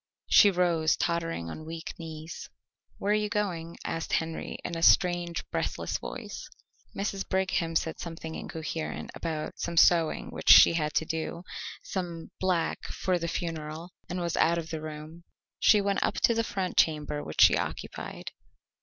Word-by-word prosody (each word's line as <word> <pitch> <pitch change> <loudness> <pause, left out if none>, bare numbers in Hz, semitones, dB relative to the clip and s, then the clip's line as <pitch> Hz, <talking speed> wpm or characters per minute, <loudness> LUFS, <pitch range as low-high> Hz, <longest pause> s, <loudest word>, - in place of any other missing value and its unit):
She 205 - +8
rose, 175 -4 +2
tottering 165 - -1
on 155 - -8
weak 165 +1 -6
knees. 160 0 -8 0.5
"Where 200 - -1
are - - +4
you 210 0 0
going?" 175 -6 -2
asked 165 0 -3
Henry 160 0 -2
in 170 - -3
a 165 - -4
strange, 175 -1 +3
breathless - - -2
voice. - - -7 0.5
Mrs. 195 -1 -3
Brigham 185 -3 0
said 160 0 0
something 165 -1 -6
incoherent 160 0 -5
about 160 -2 -4
some 170 0 -3
sewing 165 -2 +4
which - - -2
she - - +10
had 155 -2 -1
to 160 - +2
do, 160 +2 -4 0.4
some 170 -3 -5
black 180 -3 0
for 185 -2 -1
the 170 - -2
funeral, 165 0 -4 0.2
and 180 0 -3
was 170 -1 -1
out 170 +1 +4
of 165 0 -5
the 160 -1 -4
room. 155 +2 -8 0.4
She 210 - +6
went 200 0 0
up - - +1
to 235 - +5
the 230 0 +1
front 190 -4 -3
chamber 150 -2 +2
which - - -2
she - - +8
occupied. - - -5
165 Hz, 165 wpm, -28 LUFS, 160-180 Hz, 0.5 s, she